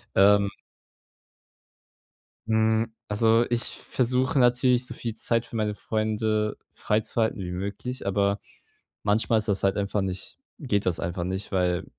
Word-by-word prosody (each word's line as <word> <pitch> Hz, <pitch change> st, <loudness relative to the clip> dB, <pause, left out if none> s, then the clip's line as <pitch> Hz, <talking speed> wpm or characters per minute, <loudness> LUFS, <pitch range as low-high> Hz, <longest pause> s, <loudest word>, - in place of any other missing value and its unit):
Ähm. 100 Hz, +1 st, +5 dB, 2.0 s
Hm, 110 Hz, 0 st, +2 dB
also 115 Hz, +2 st, +3 dB
ich 120 Hz, -1 st, +2 dB
versuche 130 Hz, +2 st, 0 dB
natürlich 125 Hz, 0 st, +4 dB
so -, -, -5 dB
viel 115 Hz, -2 st, -4 dB
Zeit 115 Hz, 0 st, 0 dB
für 115 Hz, -, -10 dB
meine 105 Hz, -1 st, -1 dB
Freunde 110 Hz, 0 st, -1 dB, 0.2 s
freizuhalten 110 Hz, 0 st, 0 dB
wie 90 Hz, -1 st, -4 dB
möglich, 100 Hz, +7 st, -4 dB
aber 100 Hz, +1 st, +1 dB, 0.6 s
manchmal 110 Hz, +2 st, +2 dB
ist 110 Hz, -, -3 dB
das 100 Hz, -2 st, +1 dB
halt 95 Hz, 0 st, +2 dB
einfach 100 Hz, 0 st, 0 dB
nicht 95 Hz, -1 st, -4 dB, 0.3 s
geht 105 Hz, -6 st, 0 dB
das 90 Hz, -3 st, 0 dB
einfach 85 Hz, +1 st, -3 dB
nicht, 95 Hz, +3 st, -4 dB
weil 90 Hz, -2 st, +1 dB
105 Hz, 135 wpm, -26 LUFS, 100-115 Hz, 2.0 s, Ähm